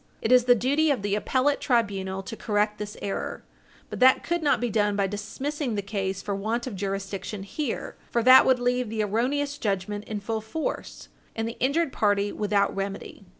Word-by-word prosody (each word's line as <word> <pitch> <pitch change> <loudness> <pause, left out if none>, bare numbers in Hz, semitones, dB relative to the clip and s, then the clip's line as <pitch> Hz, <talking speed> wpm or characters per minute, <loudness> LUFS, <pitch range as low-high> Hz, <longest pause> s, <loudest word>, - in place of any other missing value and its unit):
I - - +2
t - - +6
is 250 -1 +6
the 245 -1 +6
duty 285 +7 +2
of 260 -8 0
the 205 -1 -1
appellate 260 +7 +1
tribunal 195 -6 0
to 225 - -7
correct 210 -1 0
this 210 0 -6
error, 195 - -4 0.5
but - - -5
that 260 +1 +6
could 345 0 -1
not 290 -6 +2
be 240 -1 -1
done 210 -1 +1
by 200 -1 +1
dismissing 245 +6 -3
the 200 - -2
case 195 -1 -3
for 205 - -2
want 220 +4 -2
of 250 -6 -5
jurisdiction 195 +1 -4
here 245 +6 -4
for 235 - 0
that 255 +2 +9
would 260 -1 +5
leave 245 -1 0
the 220 -1 -1
erroneous 280 +7 -1
judgment 205 0 -2
in 215 -1 -4
full 220 +2 -3
force, 260 +9 -5 0.3
and 225 0 -2
the 230 - -7
injured 285 +4 +1
party 205 -1 +1
without 205 -1 0
remedy. 195 0 -5
215 Hz, 195 wpm, -26 LUFS, 200-255 Hz, 0.5 s, that